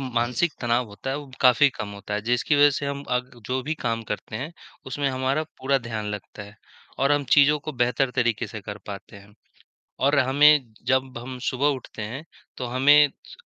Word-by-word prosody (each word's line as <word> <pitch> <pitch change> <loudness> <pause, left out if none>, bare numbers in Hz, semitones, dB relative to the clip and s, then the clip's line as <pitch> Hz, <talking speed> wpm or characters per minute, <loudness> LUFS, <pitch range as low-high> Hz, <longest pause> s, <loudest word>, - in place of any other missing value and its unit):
मानसिक 125 +5 0
तनाव 120 0 +1
होता 105 +6 -6
है 135 - -1
वो 145 -2 -10
काफ़ी 130 +3 +6
कम 105 - -6
होता 100 +1 -6
है, 105 - -1
जिसकी 125 +6 +1
वजह 145 0 +7
से 140 +1 -3
हम 140 0 -3
अग 125 +1 -4 0.2
जो 130 +1 -1
भी 155 +4 -2
काम 115 -1 -1
करते 105 0 -4
हैं, 145 +9 -5 0.3
उसमें 140 +2 -1
हमारा 130 +3 0 0.2
पूरा 135 +1 +1
ध्यान 110 -4 -5
लगता 105 0 -7
है 100 +1 -13 0.4
और 140 +2 +3
हम 145 -1 +1
चीज़ों 145 +1 +5
को 155 +1 -6
बेहतर 125 +2 +1
तरीके 120 -3 +1
से 110 - -8
कर 105 +1 -7
पाते 100 +1 -8
हैं। 100 +1 -16 0.7
और 140 +2 +3
हमें 140 -1 +5
जब 130 -1 0
हम 125 +2 -7
सुबह 130 +3 0
उठते 110 - -9
हैं, 125 +8 -6 0.3
तो 125 - -4
हमें 145 +4 +5 0.2
स - - -13
130 Hz, 200 wpm, -24 LUFS, 115-140 Hz, 0.7 s, वजह